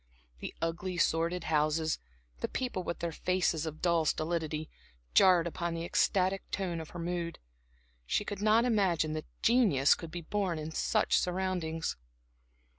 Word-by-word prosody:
The - - -6
ugly, 175 +2 -2
sordid 170 +1 +1
houses, 155 +1 +1 0.4
the - - -1
people 250 -8 -2
with 170 - -4
their 170 -1 -1
faces 165 -2 0
of 155 0 -7
dull 170 -2 +3
stolidity, 155 -1 -1 0.5
jarred 180 - +6
upon 170 0 -3
the 165 0 -3
ecstatic 190 +2 +2
tone 175 -4 -2
of 160 - -9
her - - -9
mood. 170 0 -3 0.7
She 210 - 0
could 205 -1 -5
not 220 +3 +4
imagine 185 -9 +2
that 155 0 -4 0.2
genius 215 - +5
could 165 - -6
be 175 +2 -6
born 185 0 -1
in 155 +1 -5
such - - +2
surroundings. 180 - -2
170 Hz, 150 wpm, -31 LUFS, 160-185 Hz, 0.7 s, jarred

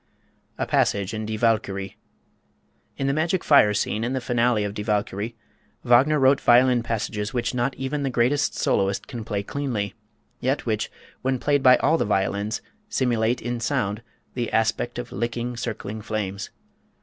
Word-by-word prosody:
A - - -1
Passage 100 +1 +1
in 110 0 -4
"Die 110 - -2
Walküre." 100 -4 0 1.0
In 135 - -2
the 140 - +2
Magic 165 +4 0
Fire 140 -8 +6
Scene 105 +1 -1
in 120 +3 -1
the 130 - 0
finale 120 -3 +1
of 100 -1 -3
"Die 105 - -4
Walküre," 105 +1 -2 0.5
Wagner 130 +6 +5
wrote 135 0 +4
violin 125 0 +5
passages 110 -1 -3
which 120 -2 -1
not 125 +2 0
even 135 +2 -3
the 135 - 0
greatest 130 +4 +1
soloist 100 0 0
can 120 -4 -6
play 105 -2 -3
cleanly, 110 -6 -3 0.5
yet 135 +3 -1
which, 110 -3 -1 0.3
when 130 0 0
played 145 +2 +1
by 130 -1 +7
all 160 +4 +2
the - - +1
violins, 100 +2 -1 0.3
simulate 120 - +1
in 120 0 -2
sound 115 -4 -1 0.3
the 120 -2 -3
aspect 115 +2 0
of 120 0 -5
licking, 120 +3 -3
circling 110 -2 -5
flames. 100 -2 -4
120 Hz, 160 wpm, -24 LUFS, 105-130 Hz, 1.0 s, by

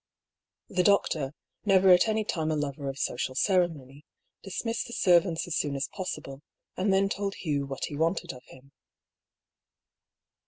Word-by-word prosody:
The 185 - 0
doctor, 165 -7 +2 0.3
never 195 -2 +5
at 180 +4 +6
any 220 0 +1
time 160 -6 -2
a 155 - +1
lover 140 -1 -3
of 135 - -6
social 130 0 -2
cere 180 +3 +3
mony, 140 -3 -13 0.4
dismissed 230 +4 -3
the 235 - -8
servants 175 -5 +3
as 175 - -3
soon 145 -2 -1
as 135 -1 -2
possible, 150 -7 -6 0.3
and 195 +2 +1
then 195 +1 +3
told 200 0 -3
Hugh 145 -4 -2
what 135 -1 -4
he 145 - -6
wanted 165 +4 -1
of 125 - -12
him. 130 +1 -17
165 Hz, 160 wpm, -28 LUFS, 140-195 Hz, 0.4 s, at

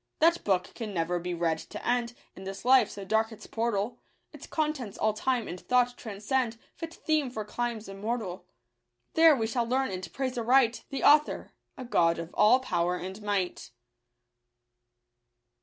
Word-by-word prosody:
That 335 +2 +3
book 185 -2 0
can 215 -5 -6
never 175 +1 0
be 175 0 -3
read 165 -1 0
to - - -8
end 240 -1 0 0.2
In 190 - -10
this 195 +3 -7
life, 255 -4 +6
so 200 -1 -8
dark 220 +3 +1
its 220 - -11
portal; 225 -1 -2 0.3
Its - - -11
contents 300 -9 -2
all 215 0 +1
time 245 +1 -1
and 180 - -6
thought 245 +2 +2
transcend 225 +2 -2
— - - -38
Fit 330 0 -5
theme 305 -4 0
for 220 -4 -5
climes 235 0 -3
immortal: 195 -1 -4 0.7
There 325 -2 +7
we 225 -4 -1
shall 230 +1 -1
leftrn 260 -3 0
and 185 0 -6
praise 255 -2 -2
aright 240 0 +3
The 275 - -4
Author 300 +1 +4
— - - -49
a 255 - -6
God 170 -7 +3
of 165 +1 -7
all 220 +5 +5
power 175 -7 0
and 190 +3 -6
might. 200 -10 -2
225 Hz, 175 wpm, -29 LUFS, 195-255 Hz, 0.7 s, There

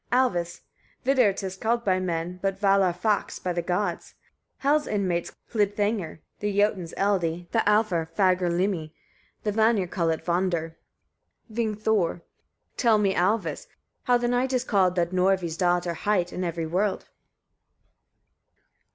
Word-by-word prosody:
Alvis. 190 -10 +1 0.4
29. - - -35 0.3
Vidr - - -18
'tis 190 -1 -5
called 235 +3 0
by 185 -2 +2
men, 175 0 -3
but 195 -1 -1
vallarfax 195 0 +2
by 180 - -3
the 175 - -1
gods, 180 +1 -2 0.4
Hel's 295 +2 +1
inmates 185 -5 -1
call 220 - -4
it 205 0 +1
hlidthangr, 205 -6 -1 0.2
the 205 -1 -2
Jotuns 205 -5 +1
eldi, 175 -4 0
the 230 - +2
Alfar 210 -6 +2
fagrlimi; 180 -3 +1 0.5
the 210 - 0
Vanir 220 -2 +3
call 170 -1 -1
it 160 - -2
vondr. 170 -2 0 0.8
Vingthor. 215 -6 0
30. - - -34 0.5
Tell 230 -4 +4
me, 200 -2 +2
Alvis! 180 -4 0
etc., - - -37 0.4
how 245 -1 +4
the 240 0 -1
night 250 +2 0
is 250 -1 +1
called, 190 -6 +2
that 170 -1 0
Norvi's 185 -2 +1
daughter 175 -1 +1
hight, 180 0 0
in 185 - -3
every 170 -2 -2
world. 190 +5 -1
190 Hz, 145 wpm, -26 LUFS, 175-210 Hz, 0.8 s, Tell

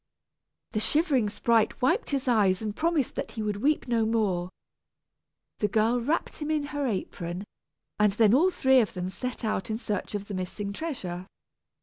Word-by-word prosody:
The 215 - 0
shivering 275 - +2
sprite 225 +1 +2
wiped 335 - +1
his 275 -1 -1
eyes 210 -5 +3
and 210 -1 -3
promised 320 -4 +1
that - - -5
he 220 - -3
would 210 -1 -1
weep 290 +7 +1
no 235 -2 +2
more. 205 -6 0 1.1
The 210 - +2
girl 225 +4 +2
wrapped 300 +8 -1
him 300 -1 -4
in 305 -2 +1
her 290 -2 0
apron, 185 -4 -3 0.6
and 210 -1 +5
then 215 0 +4
all 325 +9 +5
three 265 -7 +4
of 220 -5 0
them 180 0 -3
set 250 +2 -5
out 215 0 -1
in 220 - -1
search 210 -2 -3
of 200 0 -4
the 205 - -6
missing 200 +2 -4
treasure. 190 - -5
220 Hz, 180 wpm, -27 LUFS, 200-265 Hz, 1.1 s, and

